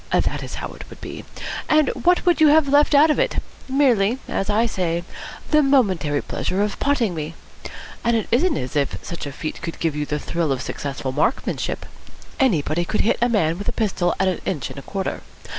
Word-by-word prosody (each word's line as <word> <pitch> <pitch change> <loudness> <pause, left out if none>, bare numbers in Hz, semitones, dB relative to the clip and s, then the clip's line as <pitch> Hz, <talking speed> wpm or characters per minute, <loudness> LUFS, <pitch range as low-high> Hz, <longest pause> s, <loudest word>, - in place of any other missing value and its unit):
That - - +1
is - - -6
how - - -5
it - - -11
would - - -12
be. - - -8 0.4
And 310 -3 +4
what 360 +1 +2
would 350 -2 +3
you 310 - +8
have 300 0 +5
left 290 +1 +4
out 305 +2 +7
of - - 0
it? - - +1 0.3
Merely, 250 -5 +3
as 195 - -2
I 215 +3 +3
say, 175 -6 -1 0.5
the 305 -1 +6
momentary 190 - +2
pleasure 195 +2 -1
of 210 - -3
potting 250 -9 +1
me. 160 0 -5 0.7
And 235 0 +2
it 220 - -2
isn't 300 +6 +3
as 125 +2 -5
if 140 -2 0
such 170 -4 -5
a - - -5
feat 155 +3 -6
could 170 -1 -5
give 165 -3 0
you 150 -1 -2
the 150 - -1
thrill 160 0 -1
of 130 -1 -1
successful 135 -1 -4
marksmanship. 150 - -1 0.5
Anybody 175 - +2
could 215 - 0
hit 225 - +1
a 240 - +3
man 175 -7 +1
with 205 - -2
a - - -3
pistol 190 -5 0
at 190 - +3
an 185 - -1
inch 145 -10 -3
and - - -8
a - - -8
quarter. 195 +5 -4
195 Hz, 210 wpm, -22 LUFS, -, 0.7 s, you